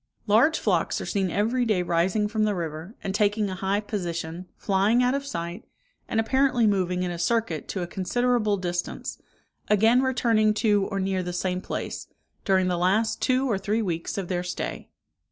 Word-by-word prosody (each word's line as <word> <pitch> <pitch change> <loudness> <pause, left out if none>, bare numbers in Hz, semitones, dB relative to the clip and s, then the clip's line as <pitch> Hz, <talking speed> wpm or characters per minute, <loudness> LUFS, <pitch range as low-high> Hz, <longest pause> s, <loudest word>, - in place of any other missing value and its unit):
Large 235 +10 +4
flocks - - 0
are - - -5
seen 195 -3 0
every 225 +7 +1
day 210 -6 +1
rising 180 +5 +1
from 215 0 0
the 210 -1 +1
river, 165 +4 -5
and 190 - -2
taking 205 0 +1
a - - -3
high 195 +2 -1
position, 175 -4 -4
flying 205 +5 +2
out 250 +1 +2
of 280 0 -2
sight, 170 -1 -5 0.4
and 225 - 0
apparently 255 +1 +2
moving 185 -3 +1
in 180 - -2
a 170 - -5
circuit 175 -4 0
to 185 - -3
a - - -2
considerable 215 +4 0
distance, 175 -1 -4 0.5
again 225 +4 +4
returning 230 -5 +2
to 205 -3 +2
or 195 -1 -3
near 190 -1 0
the 180 0 -4
same 180 +1 -1
place, - - -5 0.4
during 190 -2 +3
the 175 -1 0
last 220 +5 +1
two 260 +1 +2
or 210 -6 0
three 215 +3 0
weeks 170 -2 -3
of 195 -3 -3
their 175 -1 -1
stay. 180 0 -5
200 Hz, 185 wpm, -26 LUFS, 180-225 Hz, 0.5 s, Large